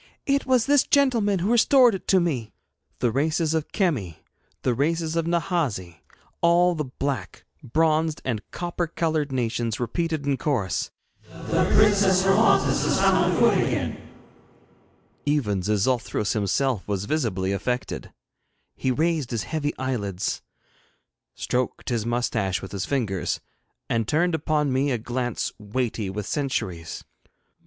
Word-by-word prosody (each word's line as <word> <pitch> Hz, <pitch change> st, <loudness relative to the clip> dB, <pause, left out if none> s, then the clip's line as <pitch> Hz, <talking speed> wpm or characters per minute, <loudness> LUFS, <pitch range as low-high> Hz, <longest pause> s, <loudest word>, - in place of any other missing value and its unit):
'It 275 Hz, -1 st, +1 dB
was 255 Hz, -3 st, +3 dB
this 285 Hz, -1 st, +5 dB
gentleman 235 Hz, -8 st, +3 dB
who 190 Hz, +5 st, 0 dB
restored 245 Hz, 0 st, +5 dB
it 190 Hz, -, -6 dB
to 190 Hz, -, +5 dB
me.' 140 Hz, -11 st, -1 dB, 0.5 s
The 120 Hz, -, +2 dB
races 155 Hz, +5 st, +1 dB
of 160 Hz, -2 st, -2 dB
Kemi, 130 Hz, -, -1 dB, 0.5 s
the 125 Hz, -, +2 dB
races 160 Hz, +5 st, 0 dB
of 165 Hz, -1 st, 0 dB
Nahasi 165 Hz, -, -1 dB, 0.4 s
all 175 Hz, +1 st, +4 dB
the 155 Hz, -3 st, -3 dB
black, 135 Hz, +1 st, -4 dB, 0.2 s
bronzed, 155 Hz, +3 st, +1 dB
and 115 Hz, -5 st, -1 dB
copper 175 Hz, 0 st, -3 dB
coloured 155 Hz, -3 st, -1 dB
nations 120 Hz, -3 st, -1 dB
repeated 155 Hz, +5 st, -2 dB
in 140 Hz, -1 st, +1 dB
chorus: 110 Hz, -, -1 dB, 0.4 s
'The -, -, -1 dB
Princess 200 Hz, -3 st, +4 dB
Hermonthis 195 Hz, +4 st, +3 dB
has -, -, +2 dB
found -, -, +3 dB
her -, -, 0 dB
foot -, -, +5 dB
again!' -, -, -1 dB, 1.3 s
Even 115 Hz, -10 st, +1 dB
Xixouthros 105 Hz, +2 st, 0 dB
himself 110 Hz, +2 st, 0 dB
was 100 Hz, -1 st, -2 dB
visibly 105 Hz, -10 st, -1 dB
affected. 125 Hz, +6 st, -3 dB, 0.6 s
He 130 Hz, -, -1 dB
raised 155 Hz, 0 st, 0 dB
his 115 Hz, -4 st, -2 dB
heavy 150 Hz, -2 st, -3 dB
eyelids, 105 Hz, -8 st, -2 dB, 0.9 s
stroked 125 Hz, 0 st, -2 dB
his 115 Hz, -2 st, -1 dB
moustache 110 Hz, -6 st, 0 dB
with 95 Hz, -1 st, -9 dB
his 100 Hz, -1 st, -3 dB
fingers, 110 Hz, -9 st, -1 dB, 0.5 s
and 115 Hz, -2 st, 0 dB
turned 175 Hz, +6 st, +2 dB
upon 150 Hz, -3 st, 0 dB
me 135 Hz, +2 st, +1 dB
a 125 Hz, -, +1 dB
glance 120 Hz, +1 st, -3 dB
weighty 110 Hz, -1 st, -2 dB
with 100 Hz, +1 st, -4 dB
centuries. 95 Hz, -, -3 dB
140 Hz, 135 wpm, -24 LUFS, 110-165 Hz, 1.3 s, this